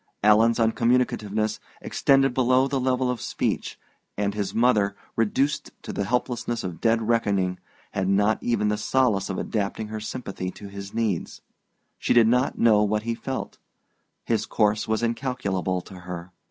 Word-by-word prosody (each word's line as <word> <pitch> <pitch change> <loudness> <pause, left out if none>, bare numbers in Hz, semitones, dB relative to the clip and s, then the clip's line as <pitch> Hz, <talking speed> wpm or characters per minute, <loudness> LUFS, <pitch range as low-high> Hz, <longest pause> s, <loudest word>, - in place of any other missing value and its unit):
Alan's 110 +2 +5
uncommunicativeness 110 -2 +1 0.2
extended 135 -1 +2
below 130 +1 +3
the 135 -1 -1
level 130 0 +1
of 125 - -5
speech, - - -2 0.4
and 100 0 0
his 100 -2 -2
mother, 110 -4 +2 0.2
reduced 135 +6 0
to - - -6
the 100 - -1
helplessness 120 +1 -1
of 85 -3 -6
dead 115 0 +2
reckoning, 100 -6 +1 0.3
had 95 -1 -1
not 100 +3 +2
even 115 -3 +1
the 105 - 0
solace 110 -4 +1
of 95 - -3
adapting 105 0 -2
her 110 0 -4
sympathy 105 -5 -5
to 100 +2 -10
his 100 0 -8
needs. 110 -7 -2 0.6
She - - +1
did 115 -2 +6
not 125 +3 +2
know 110 -3 +5
what 105 +1 +1
he 115 +1 -1
felt: 130 +3 -5 0.7
his 110 -1 0
course 105 -1 +1
was 110 +1 0
incalculable 115 -7 -1
to 95 +1 -12
her. 90 0 -7
110 Hz, 155 wpm, -25 LUFS, 100-120 Hz, 0.7 s, did